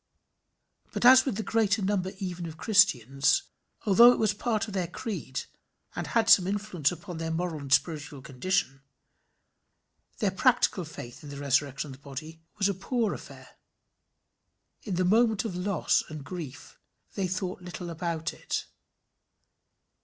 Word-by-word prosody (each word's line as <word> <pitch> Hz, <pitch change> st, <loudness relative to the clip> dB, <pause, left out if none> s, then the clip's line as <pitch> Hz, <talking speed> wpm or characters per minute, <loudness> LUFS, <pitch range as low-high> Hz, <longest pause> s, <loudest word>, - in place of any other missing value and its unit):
But -, -, -1 dB
as 260 Hz, +1 st, +8 dB
with 260 Hz, -7 st, -1 dB
the 220 Hz, -, -3 dB
greater 220 Hz, -2 st, +1 dB
number 190 Hz, -1 st, 0 dB
even 180 Hz, -3 st, -5 dB
of 160 Hz, -1 st, -9 dB
Christians, 145 Hz, -, +3 dB, 0.4 s
although 235 Hz, +4 st, +8 dB
it -, -, 0 dB
was 215 Hz, -2 st, +2 dB
part 220 Hz, 0 st, -1 dB
of 210 Hz, -, -8 dB
their 185 Hz, -3 st, -1 dB
creed, 175 Hz, -, -5 dB, 0.5 s
and -, -, -4 dB
had 230 Hz, -1 st, +1 dB
some 185 Hz, -4 st, +7 dB
influence 195 Hz, -7 st, 0 dB
upon 175 Hz, -1 st, -7 dB
their 165 Hz, 0 st, -3 dB
moral 165 Hz, -1 st, -2 dB
and 140 Hz, -1 st, -8 dB
spiritual 150 Hz, -3 st, 0 dB
condition, 135 Hz, 0 st, -1 dB, 1.4 s
their 205 Hz, -4 st, +1 dB
practical 195 Hz, -3 st, +2 dB
faith 120 Hz, -5 st, -10 dB
in 145 Hz, -, -9 dB
the 140 Hz, -, -8 dB
resurrection 140 Hz, 0 st, 0 dB
of 130 Hz, -, -9 dB
the -, -, -29 dB
body 155 Hz, +4 st, -8 dB, 0.2 s
was 200 Hz, -1 st, +2 dB
a 200 Hz, -, 0 dB
poor 215 Hz, +3 st, -1 dB
affair. -, -, -12 dB, 1.2 s
In 200 Hz, -5 st, -4 dB
the 185 Hz, +1 st, +1 dB
moment 220 Hz, +2 st, +3 dB
of 200 Hz, -5 st, -4 dB
loss 185 Hz, +2 st, +1 dB
and 155 Hz, -2 st, -7 dB
grief, 155 Hz, -5 st, -8 dB, 0.3 s
they 195 Hz, -2 st, -1 dB
thought 185 Hz, 0 st, -3 dB
little 180 Hz, -1 st, -7 dB
about 165 Hz, -1 st, -3 dB
it. -, -, -4 dB
180 Hz, 155 wpm, -28 LUFS, 155-205 Hz, 1.4 s, as